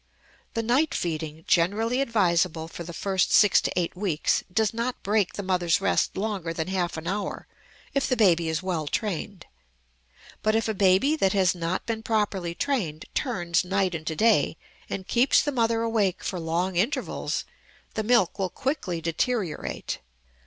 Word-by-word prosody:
The 230 - 0
night 260 +7 +2
feeding, 160 -2 -3
generally 220 +9 +2
advisable 175 -9 +1
for 170 - -8
the 170 - -7
first 190 +2 0
six 205 -2 +6
to - - -2
eight 170 0 -2
weeks, 180 -5 0
does 220 +3 +1
not 235 +2 -3
break 205 -2 +1
the 205 - -5
mother's 180 -3 +2
rest 195 - +1
longer 195 -5 -2
than 165 +2 -3
half 180 -3 -1
an 160 - -6
hour 195 +3 -3 0.5
if 275 - +1
the 255 - +1
baby 170 -6 +4
is 160 +2 -2
well 170 -5 -2
trained. 200 +1 -3 1.0
But 215 0 +2
if 225 - +1
a 220 - 0
baby 195 +9 +3
that 195 -9 +2
has 190 -3 +3
not 175 +1 -3
been 225 -1 -3
properly 205 -6 -1
trained 180 - -2
turns 175 - 0
night 190 0 0
into 160 0 -3
day 210 -5 +3 0.3
and 190 - -4
keeps 245 +6 +4
the 290 - -1
mother 230 -3 +1
awake 215 -5 0
for 185 - -3
long 170 +3 -1
intervals, 255 +8 -1 0.5
the 220 - -1
milk 215 -4 +2
will 190 -1 0
quickly 210 - -2
deteriorate. 175 +2 -2
190 Hz, 165 wpm, -26 LUFS, 170-225 Hz, 1.0 s, six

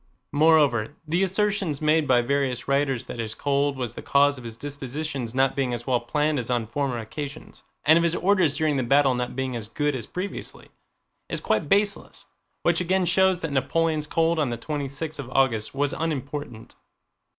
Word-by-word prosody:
Moreover, 145 -5 +3
the 170 +4 +1
assertion 195 -3 0
made 155 0 +2
by 125 -2 +4
various 130 -1 -1
writers 140 -3 +1
that - - -7
his 110 -1 -3
cold 140 0 0
was 120 -3 -3
the - - -8
cause 140 -1 +3
of - - -11
his 115 -1 -8
dispositions 140 -2 -5
not 135 0 +2
being 130 -3 0
as 120 0 -8
well 125 -2 +2
planned 150 +4 0
as 120 - -5
on 120 -2 0
former 130 +2 -2
occasions, 140 +6 -7 0.2
and 155 +2 +6
of - - +1
his 170 0 +1
orders 185 -6 +2
during 155 -3 +1
the - - +1
battle 135 +2 +4
not 125 0 -3
being 130 -1 -2
as 110 -2 -4
good 145 +5 -1
as 120 -4 -5
previously, 185 +2 -6 0.6
is - - -1
quite 110 +7 0
baseless, 205 0 0 0.4
which 170 0 +2
again 185 +1 +1
shows 185 +1 +3
that 160 - -3
Napoleon's 155 +3 0
cold 165 +1 +1
on 145 -4 +1
the 120 - -3
twenty 145 0 -3
sixth 150 +3 -6
of 130 -3 -6
August 130 -4 +1
was 145 +1 0
unimportant. 145 -6 -4
140 Hz, 190 wpm, -25 LUFS, 125-160 Hz, 0.6 s, and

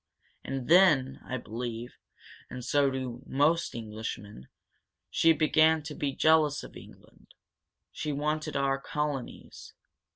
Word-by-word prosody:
"And 135 -2 -4
then, 155 -7 +4
I 130 - -3
believe 120 +1 -6 0.5
and 125 -1 -7
so 140 0 +3
do 130 -2 -5
most 155 +5 +1
Englishmen 105 - -7 0.6
she 165 - +4
began 155 0 +3
to 150 0 -7
be 145 -1 -2
jealous 155 0 +3
of - - -12
England. - - -16 0.6
She 150 - -4
wanted 150 +1 -2
our 135 0 +1
colonies. 150 -3 -5
140 Hz, 120 wpm, -29 LUFS, 125-155 Hz, 0.6 s, then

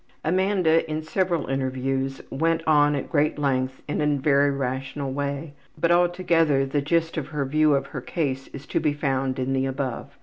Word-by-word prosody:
'' - - -20
Amanda 180 -2 +2
in 155 0 -2
several 175 0 0
interviews 135 0 -2
went 165 +3 0
on 150 -1 +4
at 140 - -3
great 150 0 +2
length 130 -2 -1
in 150 - -1
a 150 -1 +2
very 140 0 +3
rational 135 +1 -3
way, 140 +2 -3 0.2
but 170 - +2
altogether 175 -5 +3
the 140 +2 -1
gist 165 +3 0
of 150 - -2
her 150 -2 -2
view 155 +1 +3
of 135 0 0
her 140 -2 -6
case 135 -3 -2
is 140 0 -10
to - - -1
be 150 -2 +1
found 135 -2 -1
in 130 +1 -1
the 135 0 +1
above. 135 -2 -4
145 Hz, 190 wpm, -24 LUFS, 135-160 Hz, 0.2 s, on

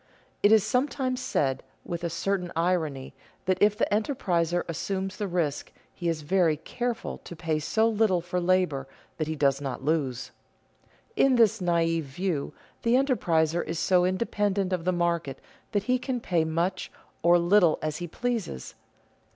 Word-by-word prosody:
It 205 - +5
is 220 -3 +6
sometimes 255 +2 0
said 135 - 0 0.2
with 170 0 -5
a 170 - 0
certain 180 +1 -2
irony 160 -6 -1 0.3
that 185 0 0
if 210 0 +4
the - - +2
enterpriser 180 - 0
assumes 190 +3 -3
the 205 - -2
risk 170 -6 -2 0.2
he 175 -2 -2
is 160 -2 -2
very 165 -1 +2
careful 240 +8 -4
to 175 - -10
pay 160 -1 -1
so 220 +9 +2
little 215 -5 +2
for 175 +2 -3
labor 175 -7 +1 0.3
that 155 - -2
he 160 - -2
does 140 -2 +2
not 135 -1 -5
lose. 140 -5 -1 0.8
In 275 -9 +4
this 225 -5 +4
naive 165 -2 +1
view 150 +2 -3 0.3
the 235 +1 +3
enterpriser 175 - +2
is 165 +1 -4
so 180 +1 +3
independent 195 0 0
of 175 -2 -2
the 185 - +3
market 170 -5 -1 0.3
that 205 -3 0
he 255 +3 +1
can 255 -1 -2
pay 170 -7 0
much 170 +4 -1 0.3
or 175 +1 +5
little 175 -1 +4
as 155 -1 -2
he 175 - -5
pleases. 225 - -3
175 Hz, 160 wpm, -27 LUFS, 160-205 Hz, 0.8 s, is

